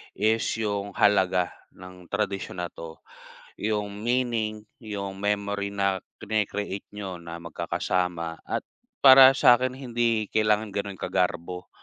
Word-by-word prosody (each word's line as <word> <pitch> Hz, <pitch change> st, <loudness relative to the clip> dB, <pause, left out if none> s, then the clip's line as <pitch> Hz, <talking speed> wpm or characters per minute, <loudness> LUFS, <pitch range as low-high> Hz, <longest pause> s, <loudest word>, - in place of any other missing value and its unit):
is 110 Hz, +2 st, +2 dB
yung 100 Hz, -2 st, -3 dB
halaga 95 Hz, -3 st, +3 dB, 0.2 s
ng 90 Hz, -1 st, -13 dB
tradisyon 100 Hz, -3 st, -3 dB
na 85 Hz, -, -5 dB
'to, 80 Hz, -1 st, -9 dB, 0.7 s
yung 105 Hz, -1 st, -2 dB
meaning, 115 Hz, -3 st, -1 dB, 0.2 s
yung 100 Hz, -3 st, -6 dB
memory 100 Hz, 0 st, -1 dB
na 100 Hz, -2 st, 0 dB, 0.2 s
krini-create 105 Hz, -2 st, -3 dB
niyo 95 Hz, -4 st, -7 dB
na 85 Hz, 0 st, -7 dB
magkakasama 85 Hz, 0 st, -2 dB
at -, -, -4 dB, 0.4 s
para 135 Hz, 0 st, +10 dB
sa'kin 125 Hz, +1 st, +5 dB
hindi 120 Hz, -4 st, 0 dB
kailangan 105 Hz, -1 st, +1 dB
ganun 100 Hz, -1 st, -4 dB
kagarbo 90 Hz, -1 st, -2 dB
100 Hz, 115 wpm, -26 LUFS, 90-110 Hz, 0.7 s, para